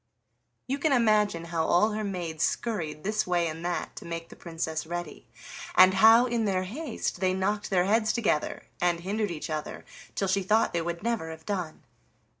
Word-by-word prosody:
'" 120 - -49
You 275 - 0
can 310 +1 +1
imagine 210 -8 +2
how 165 -1 +1
all 180 +7 +3
her 215 +1 -3
maids 175 -6 -3
scurried 160 -10 -2
this 215 0 -1
way 175 -1 +1
and 160 +1 -6
that 175 0 -3
to - - -7
make 165 0 -6
the - - -12
Princess 160 -1 -4
ready, 175 +1 -6 0.5
and 185 0 +8
how 225 +5 +7
in 235 -2 0
their 185 -2 0
haste 250 - -4
they 185 -1 +1
knocked 205 +2 -1
their 180 -2 +2
heads 215 +2 +2
together 205 -10 -1 0.2
and 175 -1 +1
hindered 205 +3 -1
each 160 -1 -5
other, 155 -1 -5 0.3
till 195 - 0
she 195 +1 +1
thought 215 +4 +2
they 170 - 0
would 170 +2 -4
never 230 -8 -1
have 160 0 -10
done. 180 -6 -4
185 Hz, 195 wpm, -28 LUFS, 165-215 Hz, 0.5 s, and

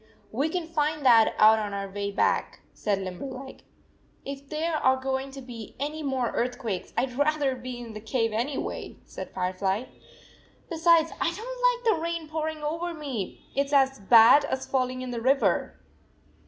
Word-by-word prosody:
" - - -33
We 300 +3 +2
can 350 0 -2
find 305 -2 -1
that 230 -3 +6
out 220 +1 +7
on 205 -2 -3
our 200 0 -3
way 200 +1 -4
back," 200 - 0
said 205 -2 -1
Limberleg. 260 +8 -7 0.6
"If 275 0 -7
there 320 +1 -1
are 260 -2 +3
going 265 +1 -2
to 270 0 -9
be 235 -4 -9
any 300 +3 -3
more 265 -5 -1
earth 245 +1 -1
107 - - -21
quakes, 215 -8 -4
I 240 - +3
d 255 - -10
rather 290 -2 +1
be 250 0 -7
in 235 -2 -8
the 215 - -8
cave 225 0 -1
anyway," 250 +6 -3
said - - -8
Firefly. 190 +3 -1 0.9
"Besides, 330 0 +4
I - - +2
don 335 0 0
t 425 - -7
like - - 0
the 320 - -5
rain 335 -1 -3
pouring 310 0 -3
over 335 +3 -2
me. 270 -10 -5
It 280 +1 +1
s 285 - -8
as 270 -2 +3
bad 230 +7 +7
as 265 -2 -3
falling 255 -1 -1
in 255 - -5
the 235 -1 -4
river." 270 +3 +1
265 Hz, 190 wpm, -27 LUFS, 230-305 Hz, 0.9 s, out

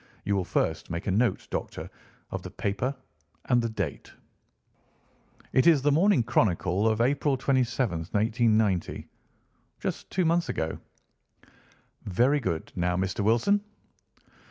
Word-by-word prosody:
You 100 - +1
will 95 -2 0
first 80 -2 -1
make 85 +3 -4
a 100 - 0
note, 105 0 +1
Doctor, - - -4 0.4
of - - -4
the - - -8
paper 115 +7 -2 0.5
and 120 -1 +3
the 115 - -1
date." 110 - -4 1.4
"It 130 - +4
is 155 -5 +5
The 145 - +3
Morning 170 - +4
Chronicle 95 -1 +1
of 110 0 +1
April 140 +2 +2
27, 125 -8 0
1890. 110 -3 +1 0.7
Just - - -4
two 185 -2 0
months 170 +1 +1
ago." 80 0 -2 1.3
"Very 125 +10 +2
good. 85 - -3
Now, 90 0 0
Mr. 95 +3 -2
Wilson?" 120 - +3
115 Hz, 130 wpm, -27 LUFS, 95-135 Hz, 1.4 s, is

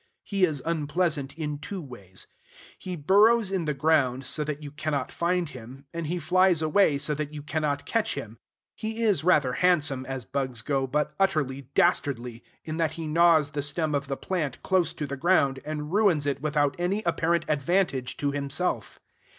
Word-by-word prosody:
He 195 -2 +2
is 150 -6 -3
unpleasant 155 -3 -1
in 150 -2 -3
two 195 +5 -5
ways. 100 - -11 0.5
He 185 -1 -5
burrows 205 +6 +4
in 185 -4 -1
the 150 - 0
ground 135 -3 +2
so 150 +3 0
that 150 0 -5
you 145 - -7
cannot 145 -3 -2
find 175 0 0
him, 130 +1 -11
and 170 -2 -4
he 175 +3 -1
flies 180 -2 +3
away 155 -1 +3
so 150 +2 -1
that 150 0 -4
you 145 - -7
cannot 150 -2 -2
catch 225 -1 0
him. 110 +1 -7 0.3
He 225 +1 -4
is 205 -7 +3
rather 150 -7 +3
handsome, 155 -7 +1
as 135 -3 -5
bugs 130 0 -3
go, 135 -1 0
but 150 +3 -1
utterly 140 -9 0
dastardly, 125 -8 +1 0.2
in 155 0 -5
that 160 -2 0
he 165 -1 -6
gnaws 160 -2 +4
the 145 - -2
stem 150 +2 0
of 140 -1 -1
the 135 -1 -3
plant 160 -9 -3
close 180 -4 +2
to 150 - -4
the 140 0 -4
ground, 140 -4 +2
and 150 +1 -5
ruins 195 -9 +3
it 140 -1 -1
without 145 -2 +1
any 195 +5 0
apparent 170 0 +1
advantage 145 -4 0
to 145 0 -1
himself. 140 +5 -2
150 Hz, 185 wpm, -26 LUFS, 140-175 Hz, 0.5 s, burrows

